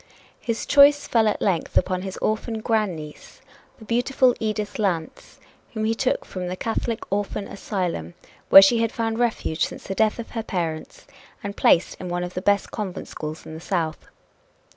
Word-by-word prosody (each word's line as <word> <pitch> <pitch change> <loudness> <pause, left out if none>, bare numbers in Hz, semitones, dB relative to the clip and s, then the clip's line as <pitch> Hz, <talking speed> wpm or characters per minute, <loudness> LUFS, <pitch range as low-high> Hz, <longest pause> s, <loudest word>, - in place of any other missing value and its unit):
His 230 -1 -3
choice 290 0 +6
fell 225 -2 +3
at 210 - 0
length 185 -5 0
upon 185 -1 +1
his 190 0 -6
orphan 220 +1 -1
grandniece, 190 -10 -3 0.4
the 220 - -13
beautiful 245 +2 +2
Edith 215 -1 -3
Lance, 175 -6 -3 0.3
whom 220 -1 -2
he 225 - +2
took 255 +3 -1
from 185 -1 -5
the 180 - -3
Catholic 225 +2 -2
Orphan 205 0 -2
Asylum, 175 - -4 0.3
where 195 - +11
she 230 +4 +4
had 230 -1 +1
found 225 -1 -2
refuge 225 -9 0
since - - -4
the 195 - -4
death 215 +2 +2
of 235 - -7
her 230 - -3
parents 165 -7 -4 0.4
and 200 0 -5
placed 170 - +3
in 180 - -5
one 175 0 -2
of 180 0 -6
the 185 - -3
best 200 +1 +1
convent 200 -4 -5
schools 155 0 -7
in - - -9
the 160 - -7
South. 165 -3 -3
205 Hz, 180 wpm, -23 LUFS, 180-225 Hz, 0.4 s, where